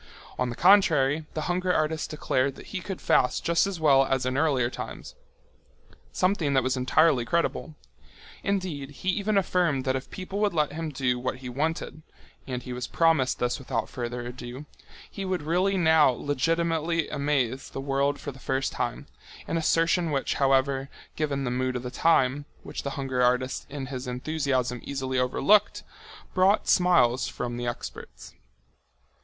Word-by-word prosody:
On 125 -1 +1
the 120 - -5
contrary, 160 -6 +4
the 155 - -1
hunger 180 +3 0
artist 155 -1 0
declared 140 -3 0
that - - -12
he 185 - -3
could 190 0 -6
fast 125 - +2
just 170 +3 +3
as 195 -4 -4
well 140 -4 +5
as 130 -1 0
in 130 0 -1
earlier 140 -4 +2
times—something 175 +1 -5
that 130 - +3
was 130 +1 0
entirely 130 +1 +3
credible. 165 +3 -1 0.7
Indeed, 180 -9 -2
he 145 +6 -4
even 205 +2 +1
affirmed 175 -8 +1
that 130 0 +1
if 130 - -5
people 190 +1 -6
would 210 -4 +1
let 150 -2 +1
him 160 0 -4
do 130 -3 -1
what 130 +1 -2
he 130 -1 -8
wanted—and 145 -2 -5
he 125 - -6
was 125 0 -4
promised 160 -6 +2
this 125 +2 -1
without 135 - -3
further 120 0 -5
ado—he 125 +10 -10
would 185 -4 -2
really 185 +5 +1
now 160 -4 +5
legitimately 165 +5 0
amaze 140 -3 -1
the - - -6
world 140 +1 0
for 145 - -6
the 135 - -14
first 135 +1 -1
time, - - -3 0.4
an - - -2
assertion 165 +1 +2
which, 140 -3 -1
however, 135 0 +1 0.3
given 145 -3 -1
the 125 - -2
mood 130 +1 -1
of 125 - -3
the 125 - -5
time, 145 -3 +2 0.2
which - - -6
the 140 - -3
hunger 130 -2 -1
artist 125 +1 +1
in 140 -1 -5
his 130 -1 -6
enthusiasm 130 -2 -1
easily 130 -2 -2
overlooked, 200 +11 +3
only - - -19
brought 190 +3 +3
smiles 170 -10 +3
from 120 -1 -4
the 120 0 -3
experts. 120 - -7
140 Hz, 160 wpm, -26 LUFS, 130-165 Hz, 0.7 s, well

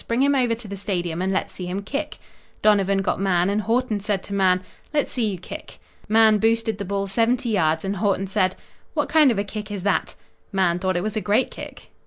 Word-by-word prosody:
Bring 235 +3 +2
him 285 +1 +4
over 245 -4 +2
to 225 -1 -10
the 200 - -5
Stadium 175 -4 -2
and 190 +1 0
let's 190 - -1
see 180 - -6
him 190 +3 -3
kick." 290 +7 -4 0.5
Donovan 200 -2 +3
got - - 0
Mahan 185 -1 +2
and 210 +1 +1
Haughton 230 0 0
said 200 -1 -2
to 200 - -7
Mahan: 185 -2 +3 0.3
"Let's 295 - +1
see 230 -4 0
you 190 - -4
kick." 175 - -9 0.3
Mahan 220 -1 +5
boosted 225 -1 +1
the 200 - -3
ball 200 +1 -1
seventy 235 +4 +1
yards, 160 -5 +1
and 195 +1 -2
Haughton 195 -1 +1
said: 190 -1 +1 0.4
"What - - 0
kind 310 -3 +6
of 230 - +1
a 200 - +1
kick 210 +1 -6
is 200 -3 -5
that?" 200 - 0 0.4
Mahan 180 -3 +2
thought 185 -1 0
it 175 - -1
was 215 0 -3
a 215 - 0
great 210 +5 +2
kick. - - -10
200 Hz, 230 wpm, -23 LUFS, 190-225 Hz, 0.5 s, kind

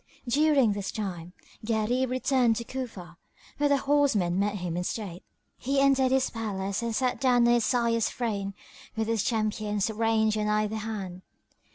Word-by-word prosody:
During 275 -3 +3
this 200 -1 -4
time 180 -5 -5 0.3
Gharib 230 +3 0
returned 255 -2 +2
to 235 - -3
Cufa, 225 -10 -7 0.4
where 290 0 +3
the 285 - +4
horsemen 265 -11 +2
met 205 +1 0
him 180 -3 -4
in 180 - -1
state. 185 -2 -5 0.4
He 275 +2 0
entered 270 -2 +3
his 265 -1 +2
palace 200 -3 -3
and 230 -1 -2
sat 255 +1 0
down 245 -3 +4
on 240 - +5
his 240 -2 +2
sire's 235 -2 +1
throne 200 -5 -3 0.4
with 220 -1 -1
his 225 -2 +1
champions 215 -1 -1
ranged 220 -1 +1
on 210 - 0
either 215 +1 0
hand. 200 -5 -5
225 Hz, 165 wpm, -27 LUFS, 205-250 Hz, 0.4 s, on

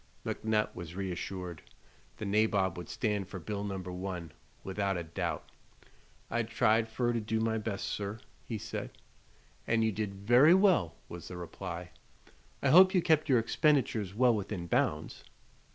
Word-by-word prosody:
McNutt 110 -1 0
was 85 -1 -8
reassured. 90 -2 -4 0.6
The - - -5
nabob 100 -3 +2
would 90 -2 -8
stand 105 -4 -1
for 95 - -7
bill 100 +4 -4
No. 100 -2 -3
1, 90 -2 -5 0.3
without 95 0 -1
a 85 - -3
doubt. 80 0 -4 0.8
"I 120 - 0
tried 110 0 +2
fer 120 +1 0
to 115 - -1
do 110 +1 -1
my 110 0 0
best, 105 -2 -3
sir," 100 +1 -4 0.2
he 115 - -4
said. - - -6 0.7
"And 115 0 +2
you 110 - +2
did 105 -1 -3
very 120 - +6
well," 185 - +3
was 85 -1 -8
the 90 - -7
reply. 90 0 -6 0.7
"I - - +3
hope 185 +3 +8
you 180 - +5
kept 155 -2 +3
your 130 - +6
expenditures 115 - +1
well 125 +1 +5
within 100 -4 -3
bounds?" 75 -2 -1
105 Hz, 155 wpm, -31 LUFS, 90-115 Hz, 0.8 s, hope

